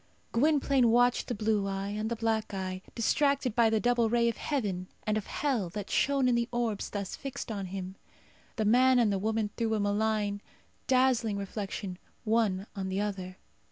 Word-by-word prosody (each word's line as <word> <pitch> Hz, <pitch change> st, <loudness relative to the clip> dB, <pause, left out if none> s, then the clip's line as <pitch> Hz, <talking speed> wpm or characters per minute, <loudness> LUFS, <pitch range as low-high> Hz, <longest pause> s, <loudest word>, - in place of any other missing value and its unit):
Gwynplaine 275 Hz, -1 st, +3 dB
watched 245 Hz, +1 st, +3 dB
the 245 Hz, -, -2 dB
blue 210 Hz, -1 st, 0 dB
eye 195 Hz, 0 st, -3 dB
and 215 Hz, +2 st, -2 dB
the 235 Hz, -, -1 dB
black 220 Hz, -2 st, -1 dB
eye, 185 Hz, -1 st, -4 dB
distracted 275 Hz, 0 st, +1 dB
by 230 Hz, -2 st, +5 dB
the 220 Hz, 0 st, +2 dB
double 240 Hz, -1 st, +2 dB
ray 235 Hz, 0 st, +3 dB
of 230 Hz, -, -4 dB
heaven 200 Hz, -11 st, -2 dB, 0.2 s
and 215 Hz, -, +1 dB
of 215 Hz, -, -3 dB
hell 250 Hz, -11 st, -1 dB
that 200 Hz, +2 st, -6 dB
shone 275 Hz, -2 st, +2 dB
in 250 Hz, -, +3 dB
the 235 Hz, 0 st, 0 dB
orbs 235 Hz, -4 st, -1 dB
thus 200 Hz, -2 st, -4 dB
fixed 270 Hz, -4 st, -6 dB
on 200 Hz, -3 st, -4 dB
him. 190 Hz, 0 st, -6 dB, 0.6 s
The 220 Hz, -, 0 dB
man 255 Hz, +4 st, +5 dB
and 225 Hz, -4 st, +3 dB
the 195 Hz, -, 0 dB
woman 220 Hz, 0 st, -1 dB
threw 225 Hz, -2 st, 0 dB
a -, -, 0 dB
malign 205 Hz, 0 st, 0 dB, 0.5 s
dazzling 255 Hz, -5 st, +3 dB
reflection 195 Hz, -2 st, -5 dB, 0.2 s
one 215 Hz, -4 st, +1 dB
on 190 Hz, -1 st, -3 dB
the 190 Hz, +1 st, -1 dB
other. 190 Hz, -3 st, -4 dB
220 Hz, 185 wpm, -30 LUFS, 200-240 Hz, 0.6 s, by